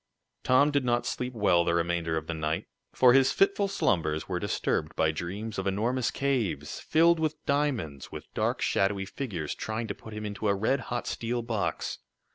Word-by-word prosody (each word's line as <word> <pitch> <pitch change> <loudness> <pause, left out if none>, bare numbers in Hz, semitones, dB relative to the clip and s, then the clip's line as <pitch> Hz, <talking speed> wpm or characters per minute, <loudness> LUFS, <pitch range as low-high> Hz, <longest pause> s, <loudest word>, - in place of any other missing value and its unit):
Tom 140 +3 +4
did 140 -2 +1
not 120 -1 +1
sleep 125 0 -3
well 95 -5 +4
the 85 0 +1
remainder 85 -1 0
of 80 - -3
the 85 - -3
night, 80 0 -2 0.3
for 125 -1 +6
his 135 0 +5
fitful 200 +1 +3
slumbers 80 - 0
were 90 -2 -2
disturbed 100 - -1
by 80 - +2
dreams 95 +7 -5
of 95 - -2
enormous 115 +6 0
caves, 110 - -1
filled 165 +1 +4
with 155 -1 0
diamonds, 130 - -1
with - - -9
dark, - - 0
shadowy 95 0 +1
figures 95 - -4
trying 110 +1 -3
to 100 - -3
put 110 +2 -11
him 105 0 -5
into 105 +1 -3
a 100 - +3
red 110 +7 +1
hot 120 -1 -2
steel 120 +1 -2
box. 105 -8 -2
105 Hz, 185 wpm, -28 LUFS, 85-130 Hz, 0.3 s, for